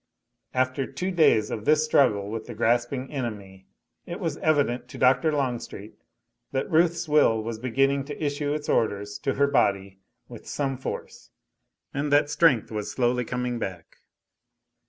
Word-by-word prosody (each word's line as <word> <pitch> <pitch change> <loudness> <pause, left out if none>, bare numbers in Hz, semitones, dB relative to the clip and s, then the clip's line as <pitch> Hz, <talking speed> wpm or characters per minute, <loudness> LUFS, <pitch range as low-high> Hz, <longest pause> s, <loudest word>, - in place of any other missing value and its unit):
After 130 +1 0
two 185 +1 -3
days 155 - +3
of 110 -1 -4
this 155 0 +4
struggle 105 -10 +2
with 110 0 -5
the 120 - -7
grasping 120 +4 0
enemy, 105 -8 -6 0.4
it 175 - -5
was 165 -5 -2
evident 145 -6 +1
to - - -10
Dr. 135 +5 +3
Longstreet 125 -7 -3 0.6
that 135 - -2
Ruth's 170 +1 +2
will 145 -7 +3
was 115 0 -5
beginning 135 +3 +1
to 145 - -7
issue 145 0 -1
its 150 0 -3
orders 105 -2 0
to 135 - -1
her 140 - +3
body 100 -8 0 0.3
with - - -12
some 135 -2 -2
force, 130 - -7 0.6
and 145 +1 -2
that 145 0 +3
strength 150 -8 +3
was 105 -1 -4
slowly 125 0 +1
coming 125 0 -3
back. 90 -6 -7
130 Hz, 155 wpm, -26 LUFS, 110-145 Hz, 0.6 s, this